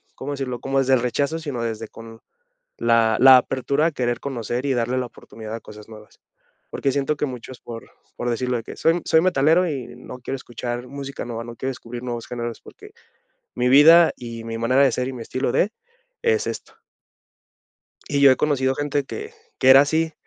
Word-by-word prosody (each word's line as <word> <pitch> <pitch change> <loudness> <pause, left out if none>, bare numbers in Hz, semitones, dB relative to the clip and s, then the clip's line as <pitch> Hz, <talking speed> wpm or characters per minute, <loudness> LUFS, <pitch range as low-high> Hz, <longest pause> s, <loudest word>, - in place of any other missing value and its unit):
¿cómo 140 +2 -6
decirlo?, 130 -3 -4
como 135 0 0
desde 135 0 +2
el 130 - +3
rechazo, 140 +6 -1
sino 140 -7 -4
desde 115 -1 -4
con 115 0 -12 0.6
la 115 -2 +3
la 130 0 +9
apertura 140 +4 0
a - - -1
querer 120 -4 -2
conocer 125 -1 -4
y 135 - +1
darle 120 +1 -1
la 125 - -2
oportunidad 110 -2 -11
a 115 - -6
cosas 105 0 -13
nuevas. 105 -1 -14 0.5
Porque 135 - -1
siento 140 +2 0
que 150 - 0
muchos 125 0 -9
por 115 -1 -10 0.3
por 120 - -2
decirlo 125 +1 -1
de 115 - -6
que: - - -9
"Soy 165 - +3
m 175 - -2
soy 160 - +4
metalero 170 +1 +3
y 135 -5 -6
no - - -10
quiero 130 +2 -4
escuchar 120 0 -6
música 140 0 -7
nueva, 115 -1 -5
no 120 0 -9
quiero 130 - -3
descubrir 120 -1 -8
nuevos 120 -2 -5
géneros 120 -1 -5
porque - - -14 0.7
mi 125 0 +1
vida 160 +5 +7
y 115 -2 -8
mi 115 0 -5
manera 130 +4 +3
de 130 - +3
ser 125 +2 -2
y 135 - -5
mi 120 - -7
estilo 130 +1 -2
de, 210 +4 +1 0.5
es 455 -2 +1
esto". - - -7 1.3
Y 140 -1 0
yo 140 -1 +8
he 130 - +4
conocido 135 -3 +1
gente 145 -1 -1
que 435 - -8 0.2
que 130 - +5
era 135 +1 +10
así, 160 +3 +1
130 Hz, 205 wpm, -22 LUFS, 120-140 Hz, 1.3 s, era